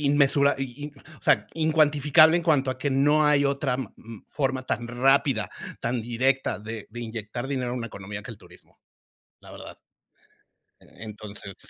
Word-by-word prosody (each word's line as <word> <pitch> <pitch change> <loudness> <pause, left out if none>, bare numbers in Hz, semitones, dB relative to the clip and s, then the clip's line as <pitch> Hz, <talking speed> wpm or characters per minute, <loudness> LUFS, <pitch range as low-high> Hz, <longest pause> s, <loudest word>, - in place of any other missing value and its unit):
in, 140 - +3
inmensura 140 0 +3 0.6
o - - -33
sea - - +3
incuantificable 155 0 +4
en 170 - -4
cuanto 140 -5 +2
a 130 - -5
que 145 - -1
no 145 +3 +3
hay 145 -1 +4
otra 140 -2 0
ma 130 - -6
ma 115 -2 -12
forma 130 -2 -1
tan 120 -2 -3
rápida, 130 -1 +2 0.3
tan 120 +1 -1
directa 130 +4 0
de 110 0 -7
de 120 +3 -8
inyectar 115 +2 -5
dinero 130 -3 -2
a - - -2
una 115 -2 -4
economía 100 0 -8
que 115 - -9
el 110 - -10
turismo, - - -19 0.7
la - - -14
verdad. - - -11 1.0
E - - -20 0.2
entonces 100 -2 -9
130 Hz, 170 wpm, -25 LUFS, 115-140 Hz, 1.0 s, incuantificable